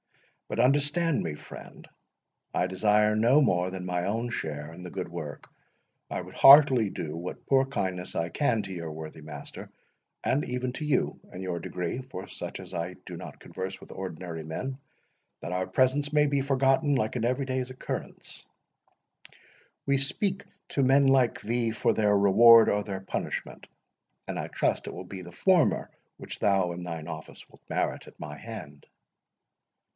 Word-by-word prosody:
But 110 Hz, -, -4 dB
understand 145 Hz, +5 st, +3 dB
me, 80 Hz, -3 st, -3 dB
friend—I 90 Hz, -, -8 dB
desire 105 Hz, +3 st, +3 dB
no 120 Hz, +7 st, +5 dB
more 90 Hz, -10 st, +2 dB
than 90 Hz, -1 st, -6 dB
my 90 Hz, -1 st, -1 dB
own 115 Hz, +4 st, -1 dB
share 75 Hz, -6 st, -4 dB
in 90 Hz, +2 st, -10 dB
the 90 Hz, -, -6 dB
good 95 Hz, 0 st, -4 dB
work. 80 Hz, -4 st, -7 dB, 0.6 s
I -, -, -3 dB
would -, -, -11 dB
heartily 135 Hz, -6 st, +8 dB
do 80 Hz, -5 st, -5 dB
what 85 Hz, +2 st, -7 dB
poor 135 Hz, -1 st, +4 dB
kindness 95 Hz, -9 st, -3 dB
I 85 Hz, +1 st, -1 dB
can 115 Hz, -, +1 dB
to 95 Hz, -1 st, -6 dB
your 85 Hz, -3 st, -5 dB
worthy 80 Hz, 0 st, -8 dB
master, 75 Hz, -1 st, -9 dB, 0.5 s
and 145 Hz, -, +1 dB
even 125 Hz, 0 st, -3 dB
to 155 Hz, -, -4 dB
you 150 Hz, -, +1 dB
in 90 Hz, -, -7 dB
your 90 Hz, -2 st, -3 dB
degree—for 95 Hz, +4 st, -5 dB
such -, -, -6 dB
as -, -, -10 dB
I -, -, -3 dB
do -, -, -7 dB
not -, -, -9 dB
converse 95 Hz, +1 st, -6 dB
with -, -, -13 dB
ordinary 85 Hz, -3 st, -6 dB
men, 130 Hz, -, -5 dB, 0.6 s
that 90 Hz, -, -5 dB
our 90 Hz, 0 st, -1 dB
presence 130 Hz, +8 st, +2 dB
may 150 Hz, -1 st, +4 dB
be 140 Hz, -1 st, +1 dB
forgotten 135 Hz, +2 st, +2 dB
like 110 Hz, -3 st, 0 dB
an 120 Hz, -, -1 dB
every 130 Hz, +3 st, 0 dB
day's 130 Hz, -1 st, -2 dB
occurrence. 130 Hz, -, -6 dB, 1.4 s
We 140 Hz, 0 st, +3 dB
speak 190 Hz, +8 st, 0 dB, 0.2 s
to 140 Hz, -, +1 dB
men 135 Hz, +2 st, +5 dB
like 130 Hz, -3 st, +3 dB
thee 115 Hz, +1 st, 0 dB
for 110 Hz, -, +1 dB
their 105 Hz, -1 st, +3 dB
reward 110 Hz, +3 st, +8 dB
or 105 Hz, 0 st, +1 dB
their 95 Hz, -2 st, -5 dB
punishment; 95 Hz, -, -5 dB, 0.6 s
and -, -, -4 dB
I -, -, -3 dB
trust -, -, -1 dB
it -, -, -5 dB
will 90 Hz, -, -7 dB
be 95 Hz, 0 st, -7 dB
the 85 Hz, -1 st, -10 dB
former 180 Hz, -, +2 dB, 0.3 s
which -, -, -8 dB
thou 95 Hz, -3 st, +2 dB
in 85 Hz, +1 st, -6 dB
thine 80 Hz, -3 st, -5 dB
office 80 Hz, -1 st, -8 dB
wilt -, -, -21 dB
merit -, -, -1 dB
at -, -, -15 dB
my 75 Hz, -1 st, -6 dB
hand." 75 Hz, -7 st, -9 dB
105 Hz, 170 wpm, -28 LUFS, 90-130 Hz, 1.4 s, heartily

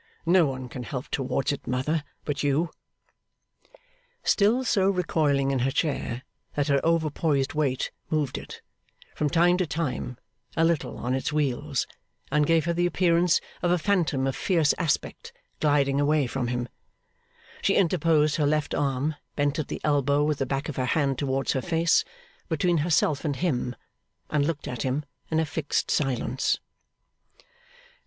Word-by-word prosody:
No 170 Hz, -1 st, +5 dB
one 130 Hz, -1 st, -4 dB
can 125 Hz, +1 st, -7 dB
help 130 Hz, +1 st, -5 dB
towards 135 Hz, +1 st, -1 dB
it, 140 Hz, -, -6 dB
mother, 145 Hz, +5 st, 0 dB, 0.2 s
but 145 Hz, -1 st, -2 dB
you.' 150 Hz, +3 st, +1 dB, 1.5 s
Still 225 Hz, +5 st, +3 dB
so 195 Hz, -6 st, +2 dB
recoiling 150 Hz, -7 st, +1 dB
in 135 Hz, -, +1 dB
her 130 Hz, +2 st, +1 dB
chair 135 Hz, -4 st, -1 dB, 0.3 s
that 145 Hz, 0 st, 0 dB
her 140 Hz, -1 st, +3 dB
overpoised 155 Hz, -4 st, +1 dB
weight 140 Hz, -4 st, 0 dB, 0.2 s
moved 150 Hz, -4 st, 0 dB
it, -, -, -11 dB, 0.5 s
from 150 Hz, -, 0 dB
time 175 Hz, +3 st, +4 dB
to 185 Hz, -2 st, 0 dB
time, 140 Hz, -5 st, -3 dB, 0.4 s
a 165 Hz, -, +4 dB
little 165 Hz, -3 st, 0 dB
on 125 Hz, +1 st, -2 dB
its 130 Hz, +3 st, -1 dB
wheels, 145 Hz, -2 st, 0 dB, 0.5 s
and 150 Hz, 0 st, +3 dB
gave 165 Hz, -2 st, +3 dB
her 170 Hz, -, +1 dB
the 175 Hz, +1 st, +2 dB
appearance 175 Hz, -1 st, +3 dB, 0.2 s
of 175 Hz, -, +1 dB
a 180 Hz, -, +4 dB
phantom 160 Hz, -7 st, +1 dB
of 135 Hz, -, -1 dB
fierce 165 Hz, -6 st, +2 dB
aspect 185 Hz, -, -2 dB, 0.3 s
gliding 140 Hz, -2 st, +2 dB
away 150 Hz, 0 st, +3 dB
from 125 Hz, 0 st, -2 dB
him, 120 Hz, 0 st, -2 dB, 0.9 s
she -, -, +2 dB
interposed 155 Hz, -4 st, +3 dB
her 150 Hz, -2 st, +2 dB
left 150 Hz, 0 st, 0 dB
arm, 140 Hz, +2 st, 0 dB, 0.2 s
bent 145 Hz, +1 st, 0 dB
at 155 Hz, -, -2 dB
the -, -, -4 dB
elbow 145 Hz, -1 st, +2 dB
with 150 Hz, -1 st, 0 dB
the 135 Hz, -, 0 dB
back 135 Hz, +3 st, -2 dB
of 150 Hz, -, -5 dB
her 130 Hz, -, 0 dB
hand 135 Hz, -1 st, +1 dB
towards 135 Hz, -1 st, 0 dB
her 130 Hz, -, 0 dB
face, 165 Hz, +1 st, +2 dB, 0.5 s
between 170 Hz, +1 st, +2 dB
herself 155 Hz, -2 st, +2 dB
and 145 Hz, -3 st, -1 dB
him, 125 Hz, -7 st, -1 dB, 0.6 s
and 145 Hz, -1 st, +2 dB
looked 165 Hz, -3 st, -3 dB
at 125 Hz, -2 st, -4 dB
him 135 Hz, +4 st, -1 dB, 0.2 s
in 160 Hz, -, +1 dB
a 160 Hz, -, +2 dB
fixed 155 Hz, -1 st, -1 dB
silence. 130 Hz, -2 st, 0 dB
150 Hz, 160 wpm, -26 LUFS, 135-165 Hz, 1.5 s, No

